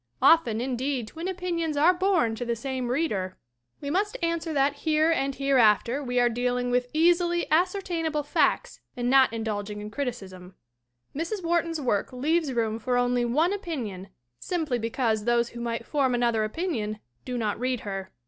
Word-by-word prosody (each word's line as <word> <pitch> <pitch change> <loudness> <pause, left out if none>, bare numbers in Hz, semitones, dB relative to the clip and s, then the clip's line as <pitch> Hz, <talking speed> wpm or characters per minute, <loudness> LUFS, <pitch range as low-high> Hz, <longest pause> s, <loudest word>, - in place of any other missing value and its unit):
Often, 240 -9 +4
indeed, 255 -1 -2
twin 330 +3 -6
opinions 340 -4 -2
are 325 +5 +5
born 360 - +2
to 225 - -4
the 235 -1 -1
same 260 +1 -3
reader! 225 - -1 0.4
We 285 - -3
must 415 +7 0
answer 335 -1 -1
that 285 -1 +1
here 315 +1 +2
and 275 -4 0
hereafter 260 -1 +3
we 250 -1 0
are 245 - +4
dealing 245 +1 -1
with 245 0 +1
easily 345 +2 +3
ascertainable 335 -3 0
facts 295 - 0 0.2
and 245 0 0
not 265 -2 +6
in 225 -1 -4
dulging 210 -1 -4
in 210 0 -7
criticism. 195 -8 -6 0.6
Mrs. 345 +6 -3
Wharton's 335 -1 0
work 240 -8 0
leaves 300 +4 0
room 225 -2 -1
for 245 +2 0
only 245 0 +2
one 310 +10 +2
opinion 245 - -5 0.3
simply 315 - -2
because 225 -2 -1
those 235 0 +2
who 235 - -8
might 235 -1 -3
form 270 -4 +1
another 235 -2 +1
opinion 215 - -2 0.3
do 250 -1 -4
not 215 -2 -1
read 250 -1 -1
her. 195 -2 -5
255 Hz, 165 wpm, -26 LUFS, 230-325 Hz, 0.6 s, not